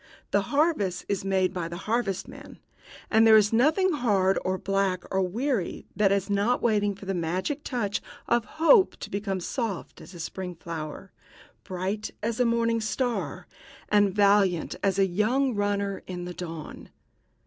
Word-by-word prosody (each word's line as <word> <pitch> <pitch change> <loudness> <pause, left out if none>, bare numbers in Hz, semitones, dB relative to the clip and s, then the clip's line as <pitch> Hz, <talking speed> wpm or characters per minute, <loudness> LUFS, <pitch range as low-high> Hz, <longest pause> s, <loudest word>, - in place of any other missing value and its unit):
The - - +3
harvest 280 - +1
is 200 -2 -1
made 190 -1 +1
by 175 -3 -3
the 170 +1 -6
harvestman 215 -4 -3 0.5
and 225 0 +6
there 220 -1 +9
is 210 +1 +3
nothing 310 +11 +3
hard 200 -8 +2
or 185 0 0
black 195 -2 0
or 190 - +2
weary 215 +2 -2
that 205 -2 +3
is 200 -1 +1
not 205 +4 +1
waiting 205 -3 +1
for 200 - -12
the 195 - -1
magic 185 - -2
touch 220 -6 -2 0.3
of 235 -1 +2
hope 375 +5 +5
to - - -8
become 195 -1 -2
soft 215 0 -4
as 180 - -12
a - - -10
spring 180 +2 -5
flower, 165 +2 -7 0.5
bright 190 +3 -3
as 230 0 -1
the 250 - +3
morning 230 -1 +1
star, 240 +2 -2 0.4
and 205 -1 +4
valiant 200 -4 +3
as 195 -1 +1
a 195 - +4
young 230 +8 +1
runner 200 -1 -1
in 180 -1 -5
the 180 - -6
dawn." 165 -3 -8
200 Hz, 160 wpm, -27 LUFS, 185-230 Hz, 0.5 s, there